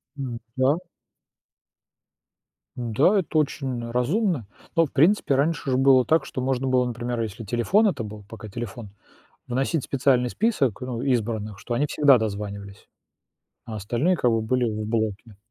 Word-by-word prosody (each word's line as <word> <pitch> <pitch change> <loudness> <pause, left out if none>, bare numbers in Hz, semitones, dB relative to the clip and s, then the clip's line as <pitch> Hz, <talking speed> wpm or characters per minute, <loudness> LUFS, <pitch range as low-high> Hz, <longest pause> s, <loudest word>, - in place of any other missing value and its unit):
М, 130 -5 -5 0.2
да. 130 +4 +3 2.0
Н-да, 125 - +2
это 165 -3 -2
очень 130 -5 -1
разумно. 145 - 0 0.3
Но, 165 -1 +5
в 145 - -11
принципе, 160 -1 +3
раньше 145 0 0
ж - - +2
было 130 -1 +5
так, 160 +1 +2
что 130 - -5
можно 130 0 -1
было, 130 -1 +3
например, 120 0 -3
если 110 0 -5
телефон 120 - +2
это 140 - -1
был 105 -1 -8
пока 110 -1 -9
телефон 115 0 -7 0.6
вносить 135 +4 -1
специальный 125 -2 +2
список, 145 - 0
ну, 125 -2 -4
избранных, 110 -5 -1
что 120 - -4
они 145 +5 +1
всегда 145 -3 +5
дозванивались, 100 -2 -5 0.8
а 110 - -6
остальные, 120 - 0
как 125 - +2
бы, 115 -1 +1
были 125 +3 +1
в 110 -2 -2
блоке. 110 -1 -2
125 Hz, 150 wpm, -24 LUFS, 110-140 Hz, 2.0 s, Но